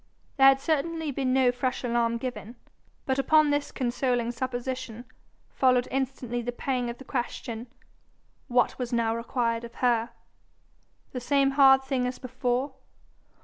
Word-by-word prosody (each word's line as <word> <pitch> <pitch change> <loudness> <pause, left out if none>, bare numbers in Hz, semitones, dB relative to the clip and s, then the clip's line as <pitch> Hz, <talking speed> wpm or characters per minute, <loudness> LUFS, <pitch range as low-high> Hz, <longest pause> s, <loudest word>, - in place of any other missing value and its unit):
There 270 0 +7
had 270 0 +6
certainly 320 +1 -1
been 265 -1 -1
no 255 -1 +4
fresh 255 +1 -2
alarm 235 -1 +1
given. 245 -1 -6 0.5
But 265 -1 0
upon 305 +1 +4
this 290 0 -1
consoling 245 -1 -1
supposition 245 -1 -4 0.5
followed 250 -2 +3
instantly 255 -2 -2
the 240 +1 -3
pang 250 0 -2
of 235 - -6
the - - -11
question: 240 -2 -4 0.8
what 245 +1 +1
was 250 -1 -3
now 230 -1 +1
required 230 0 -1
of 235 - -10
her? 240 -2 +1 1.0
The 250 - -5
same 275 +1 +2
hard 270 -1 +6
thing 265 -2 -1
as 250 - -4
before? 255 +1 -2
255 Hz, 145 wpm, -27 LUFS, 240-270 Hz, 1.0 s, There